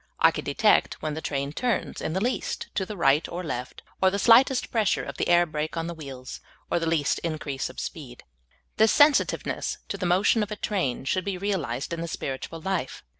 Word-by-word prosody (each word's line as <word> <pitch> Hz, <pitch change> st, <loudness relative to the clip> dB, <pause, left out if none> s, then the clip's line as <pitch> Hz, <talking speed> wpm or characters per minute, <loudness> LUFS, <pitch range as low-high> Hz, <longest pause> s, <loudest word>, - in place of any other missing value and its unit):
I -, -, +6 dB
can -, -, -5 dB
detect -, -, +2 dB
when 155 Hz, -1 st, -1 dB
the 160 Hz, -, -5 dB
train 140 Hz, -1 st, -2 dB
turns 245 Hz, +3 st, -1 dB
in 160 Hz, -, -2 dB
the 190 Hz, -, 0 dB
least 245 Hz, +6 st, -2 dB
to 190 Hz, -, -1 dB
the 210 Hz, -, -6 dB
right 145 Hz, -2 st, +3 dB
or 180 Hz, +1 st, -5 dB
left, 125 Hz, -6 st, -5 dB, 0.2 s
or 190 Hz, -, +6 dB
the 200 Hz, -, -2 dB
slightest 245 Hz, +5 st, +5 dB
pressure 220 Hz, -3 st, +1 dB
of -, -, -7 dB
the -, -, -1 dB
air 175 Hz, 0 st, +5 dB
brake 155 Hz, 0 st, -4 dB
on 165 Hz, -, -1 dB
the 170 Hz, -, -4 dB
wheels, 135 Hz, -5 st, -8 dB, 0.3 s
or -, -, +2 dB
the 165 Hz, -, -2 dB
least 155 Hz, -3 st, +1 dB
increase 150 Hz, -4 st, -3 dB
of -, -, -12 dB
vSpeed. 130 Hz, -7 st, -7 dB, 0.6 s
This 220 Hz, 0 st, +5 dB
sensitiveness 290 Hz, 0 st, +3 dB
to -, -, -4 dB
the 180 Hz, -, -1 dB
motion 190 Hz, +5 st, +3 dB
of 210 Hz, -, -2 dB
a 210 Hz, -, -4 dB
train 185 Hz, -, -2 dB
should 185 Hz, +7 st, 0 dB
be 195 Hz, -1 st, -3 dB
realized 170 Hz, -9 st, -2 dB
in 165 Hz, -, -3 dB
the 170 Hz, -, -3 dB
spiritual 155 Hz, +1 st, -5 dB
life. 180 Hz, -7 st, -3 dB
170 Hz, 215 wpm, -26 LUFS, 145-200 Hz, 0.6 s, I